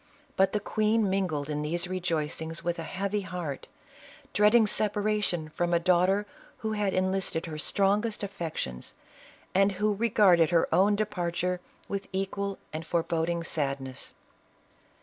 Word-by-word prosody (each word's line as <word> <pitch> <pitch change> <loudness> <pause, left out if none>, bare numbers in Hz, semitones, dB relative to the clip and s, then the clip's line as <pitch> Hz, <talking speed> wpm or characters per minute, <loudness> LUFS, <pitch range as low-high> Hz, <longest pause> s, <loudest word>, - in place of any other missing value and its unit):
But 190 0 +4
the 210 - 0
queen 215 +1 +1
mingled 180 -7 0
in 150 -1 -2
these 170 +4 0
rejoic 170 -5 -2
ings 160 +1 -5
with 175 0 -1
a - - -3
heavy 200 +2 -1
heart, 175 -7 -5 0.7
dreading 215 +2 +5
separation 205 -5 0
from 175 +2 0
a - - +4
daughter 185 +3 +3 0.4
who 220 - 0
had 205 -3 0
enlisted 185 -3 0
her 155 -2 -6
strongest 205 +5 +1
affections, 160 - -5 0.6
and 195 +1 +4
who 210 +3 +1
regarded 200 -6 +4
her 170 -2 +3
own 200 +2 +5
departure 180 -3 -1 0.3
with 200 -1 -4
equal 195 +1 -2 0.2
and 155 +1 -4
fore 165 0 0
boding 170 +1 -1
sadness. 135 -5 -3
185 Hz, 140 wpm, -28 LUFS, 165-205 Hz, 0.7 s, dreading